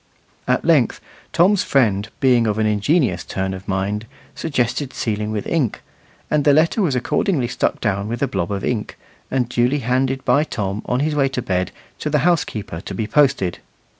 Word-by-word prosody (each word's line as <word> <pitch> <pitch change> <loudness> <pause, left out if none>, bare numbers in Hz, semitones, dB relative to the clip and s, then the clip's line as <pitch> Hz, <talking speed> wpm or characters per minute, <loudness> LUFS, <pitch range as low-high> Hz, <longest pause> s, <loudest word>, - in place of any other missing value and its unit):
At - - +1
length - - +3 0.3
Tom's 190 +3 +4
friend, 110 -6 +1
being 125 -4 +4
of 105 0 0
an 110 - +1
ingenious 105 - +1
turn 95 0 -3
of 95 0 -9
mind, 100 +3 -2 0.3
suggested 130 -2 -1
sealing 105 -2 -2
with 105 -2 -3
ink; 145 -10 -1 0.5
and 150 -1 +2
the 145 - +5
letter 165 +8 +3
was 155 -9 +1
accordingly 130 +2 0
stuck - - -1
down 100 -2 -1
with 120 +4 -2
a - - +2
blob 85 -5 -2
of 100 -1 -2
ink, 110 -4 -2 0.3
and 130 -2 0
duly 125 +4 +1
handed 130 +1 0
by 135 +4 +4
Tom, 105 -8 -3
on 125 +2 0
his 155 +1 0
way 140 -2 +2
to 125 -2 -3
bed, 90 -4 -1 0.3
to 150 - -2
the 150 +1 +1
housekeeper 110 - -1
to 95 - -7
be 110 - -1
posted. 135 - +2
120 Hz, 185 wpm, -20 LUFS, 105-140 Hz, 0.5 s, the